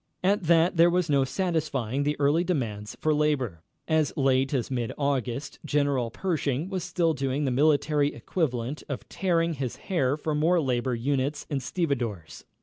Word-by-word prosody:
At 195 -1 +2
that 170 +2 +4
there 170 +1 +7
was 175 -2 +1
no 140 -1 +4
satisfying 145 - -1
the 145 +1 -1
early 145 +4 +3
demands 110 - -3
for 155 - +2
labor. 140 - 0 0.3
As 160 -2 +2
late 135 -1 +2
as 130 -3 -1
mid 120 -3 -1
August 140 -1 -2
General 140 -5 +1
Pershing 155 - -2
was 185 -3 -2
still 165 -3 +1
doing 135 +1 -1
the 130 - +1
military 145 +1 +2
equivalent 135 -5 -2
of 140 - -5
tearing 170 -3 +1
his 135 -4 -4
hair 145 -7 0
for 155 0 -2
more 165 +4 +3
labor 125 -3 0
units 135 +4 -1
and 140 -2 -1
stevedores. 125 - -3
145 Hz, 160 wpm, -27 LUFS, 130-160 Hz, 0.3 s, there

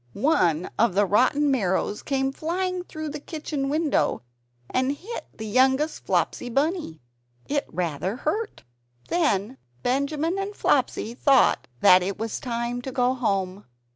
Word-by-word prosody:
One 180 - +1
of 220 -4 +3
the 205 +1 +4
rotten 260 +8 +3
marrows 205 -4 0
came 270 -1 0
flying 360 +5 -2
through 310 -3 -6
the 300 +1 -5
kitchen 295 -2 -4
window, 300 - +1 0.4
and 260 +2 0
hit 415 +11 -7
the 220 - -8
youngest 265 +7 +2
Flopsy 245 - 0
Bunny. 280 - -1 0.4
It 285 0 -1
was - - -19
rather 175 +2 -2
hurt. 415 - -3 0.5
Then 265 - 0 0.2
Benjamin 295 +7 0
and 400 +1 -4
Flopsy 225 - +1
thought 270 +1 +3
that 185 0 +7
it 190 +2 -3
was 225 -1 -3
time 235 0 -3
to 265 - -6
go 250 0 +2
home. 200 -5 -1
265 Hz, 140 wpm, -25 LUFS, 210-305 Hz, 0.5 s, that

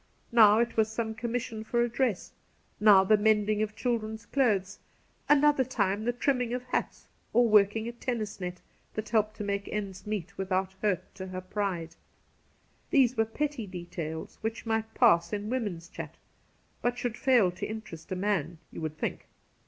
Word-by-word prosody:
Now 215 -3 +7
it 235 0 0
was 220 0 +3
some 220 0 -2
commission 230 -1 -3
for 235 +2 +1
a - - +1
dress, 240 -4 -1 0.5
now 205 -2 +7
the 215 +3 +5
mending 210 0 +2
of 215 0 -2
children's 220 -2 -2
clothes 205 -8 +1 0.2
— - - -38
another 295 -1 +5
time 210 -4 -1
the 240 - +2
trimming 245 0 0
of 250 - -4
hats 250 - -3 0.3
or 240 0 +5
working 210 +1 +4
a - - -3
tennis 235 -4 -4
net, 180 0 -5 0.3
that 215 0 -4
helped 215 -2 +1
to - - -4
make 200 0 -2
ends 200 -2 -5
meet 200 -2 -4
without 190 0 -1
hurt 200 -5 -1
to 190 -1 -7
her 185 0 -5
pride. 185 -4 -3 0.9
These 260 -5 +4
were 225 -1 +2
petty 265 0 -3
details 170 -3 -6
which 225 +2 -3
might 220 0 -1
pass 170 -8 +4
in 210 +2 -3
woman's 205 -10 -3
chat, - - -8 0.6
but 245 0 0
should 245 -2 -2
fail 240 -10 +4
to 180 - -5
interest 215 -7 -8
a - - 0
man, 180 -4 -1
you - - -7
would 155 -1 -4
think. - - -4
215 Hz, 175 wpm, -29 LUFS, 190-235 Hz, 0.9 s, Now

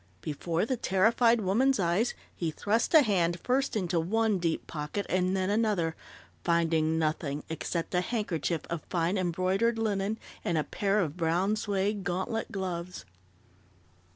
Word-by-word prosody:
Before 165 +4 -1
the 255 +2 -1
terrified 230 +4 +3
woman's 245 +8 +2
eyes 185 +6 +1 0.2
he 170 - -2
thrust 215 - 0
a 310 - +9
hand 175 -6 +1
first 265 +4 0
into 180 -4 0
one 215 +4 +1
deep 165 -2 -1
pocket 150 +6 -4
and 185 +1 +1
then 190 +1 0
another, 205 -7 +1 0.5
finding 165 -2 +2
nothing 155 -2 -1
except 165 +2 -3
a 180 - +3
handkerchief 175 - -1
of 170 -2 -2
fine 175 +1 +1
embroidered 185 +5 +1
linen 210 -1 0 0.3
and 170 - 0
a 155 - +2
pair 200 +5 0
of 160 -2 -3
brown 175 +5 +1
suede 205 -1 -1
gauntlet 190 +6 -2
gloves. 180 - -4
185 Hz, 145 wpm, -29 LUFS, 170-210 Hz, 0.5 s, a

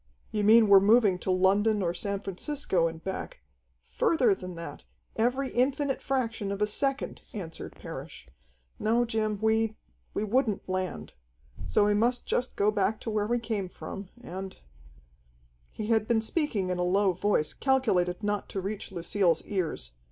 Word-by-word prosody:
"You 210 -2 -1
mean 220 +1 +7
we're 200 -1 +9
moving 205 -2 +4
to - - -5
London 200 +3 +3
or 170 -1 0
San 200 0 -3
Francisco 195 - -1
and 165 0 -7
back 345 - -5 0.2
" - - -44 0.2
"Further 320 - +4
than 180 -2 -7
that, 170 0 -8 0.3
every 255 +4 +1
infinite 270 +2 +1
fraction 230 -6 -1
of 200 - -3
a 210 - +3
second," 270 +6 -1
answered 175 -6 -7
Parrish. - - -9 0.5
"No, 235 +3 +2
Jim, 215 -2 -1
we 220 0 +2 0.4
we 205 - 0
wouldn't 220 -1 0
land. 185 0 -3 0.5
So 205 - +3
we 205 - +3
must 240 +4 +1
just 250 - -1
go 205 +1 +3
back 210 +1 0
to 225 - -4
where 210 -1 0
we 240 +2 +1
came 215 -5 -3
from, 195 +1 -8
and 190 -3 -7 0.6
" - - -36
He 215 - -5
had 220 -1 +2
been 230 -2 +2
speaking 220 - 0
in 180 -1 -1
a - - +1
low 190 +1 +3
voice, 175 -4 +1
calculated 215 -9 +1
not 205 0 -1
to 195 - -3
reach 195 +2 -5
Lucille's 175 -1 +1
ears. 175 - -2
205 Hz, 165 wpm, -28 LUFS, 185-230 Hz, 0.6 s, we're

